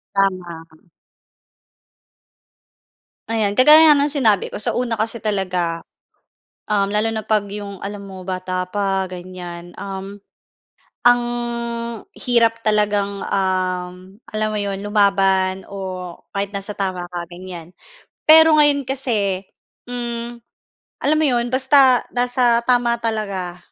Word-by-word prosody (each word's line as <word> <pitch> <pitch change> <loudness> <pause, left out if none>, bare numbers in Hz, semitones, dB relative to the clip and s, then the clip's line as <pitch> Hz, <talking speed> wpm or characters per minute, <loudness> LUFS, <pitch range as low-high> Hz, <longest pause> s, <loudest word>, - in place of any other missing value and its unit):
Tama. 185 -3 0 2.7
Ayan, 215 -3 0
kagaya 305 +5 +8
nga 300 - +8
ng 285 +1 +1
sinabi 225 -9 +1
ko - - -5
sa - - -1
una 235 -3 -1
kasi 225 +2 -1
talaga, 185 -6 -2 0.9
uhm, 200 -1 +1
lalo 210 +2 +1
na 220 -1 -3
'pag 210 -2 0
'yong 200 -1 -7
alam 200 0 -6
mo 190 -1 -9
bata 185 0 -3
pa, 195 -1 -1
ganyan, 175 -1 -9
uhm, 195 0 -7 0.9
ang 245 0 +6 1.0
hirap 230 -2 +2
talagang, 205 -2 +1
uhm, 185 0 -2 0.2
alam 215 0 0
mo 215 - -2
'yon, 200 -1 -3
lumaban 195 -2 +2
o 185 -3 -6 0.2
kahit 200 0 -2
nasa 200 +1 -5
tama 185 -3 -3
ka, 175 -1 -7
ganyan. 175 -2 -9 0.5
Pero 320 0 +7
ngayon 290 -3 +3
kasi, 215 -8 -1 0.5
hmm, 240 -1 -5 0.6
alam 305 +2 +3
mo 315 - +2
'yon, 240 -3 +1
basta 260 -1 +5
nasa 245 -1 +2
tama 240 -1 +2
talaga, 200 -6 -3
200 Hz, 120 wpm, -20 LUFS, 185-235 Hz, 2.7 s, kagaya